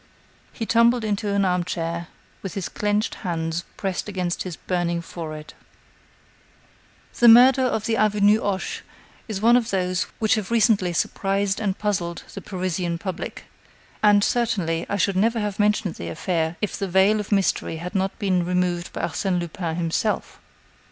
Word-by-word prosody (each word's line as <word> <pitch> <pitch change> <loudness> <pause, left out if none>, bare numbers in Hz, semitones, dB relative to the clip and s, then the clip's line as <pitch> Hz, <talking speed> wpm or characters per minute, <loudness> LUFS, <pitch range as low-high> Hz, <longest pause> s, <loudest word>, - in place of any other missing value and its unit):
He 225 - -5
tumbled 235 +1 +3
into 210 -1 -1
an 200 -1 +2
armchair, 170 -2 -2 0.3
with 195 - -6
his 195 -3 -3
clenched 210 +1 -1
hands 165 -2 -2
pressed 195 +1 -3
against 180 -3 -2
his 180 -3 -4
burning 175 -1 -1
forehead. 155 -2 -8 1.7
The 240 - +6
murder 250 +3 +8
of 225 -4 0
the 225 -1 0
avenue 210 0 +3
Hoche 195 -2 -2 0.5
is 210 -4 -4
one 235 +2 +6
of 235 -2 +2
those 185 0 0
which 220 -1 +2
have 215 -3 -1
recently 215 -5 +3
surprised 195 +3 0
and 200 -3 -1
puzzled 180 -5 -2
the - - -7
Parisian 180 -2 -2
public, 185 0 -6 0.6
and, 205 -1 +5
certainly, 190 -10 0
I - - 0
should 200 0 +1
never 225 +4 +2
have 210 -2 -3
mentioned 210 -3 +2
the 85 - -7
affair 160 - -1
if 210 - -1
the 195 - -1
veil 190 +4 +3
of 210 - -6
mystery 195 -4 +1
had 175 +4 -6
not 195 -1 -1
been 185 -3 +1
removed 180 0 -1
by - - -4
Arsène 185 -3 -1
Lupin 170 -1 -4
himself. 170 +5 -2
195 Hz, 160 wpm, -23 LUFS, 175-210 Hz, 1.7 s, murder